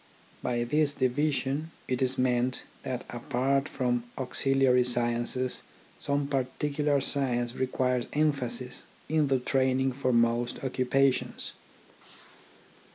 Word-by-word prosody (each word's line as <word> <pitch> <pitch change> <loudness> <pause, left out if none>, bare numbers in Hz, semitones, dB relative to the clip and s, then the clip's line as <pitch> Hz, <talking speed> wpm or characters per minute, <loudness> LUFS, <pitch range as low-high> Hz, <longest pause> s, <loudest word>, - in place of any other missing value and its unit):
By 120 -1 0
this 145 +3 +1
division, 140 +3 0 0.2
it 125 0 -1
is 130 0 +1
meant 125 0 +1 0.2
that 125 -2 -4
apart 135 +3 0
from 120 -2 -1
auxiliary 130 -1 +2
sciences 120 +1 0 0.4
some 140 0 0
particular 140 +2 0
science 125 -4 0
re 130 0 -1
quires 125 -1 0
emphasis 135 -4 -1 0.3
in 155 -1 +2
the 135 -1 +3
training 130 +1 +1
for 130 0 -1
most 120 0 +2
occu 130 -1 -2
pations. 135 0 +1
130 Hz, 110 wpm, -29 LUFS, 125-140 Hz, 0.4 s, the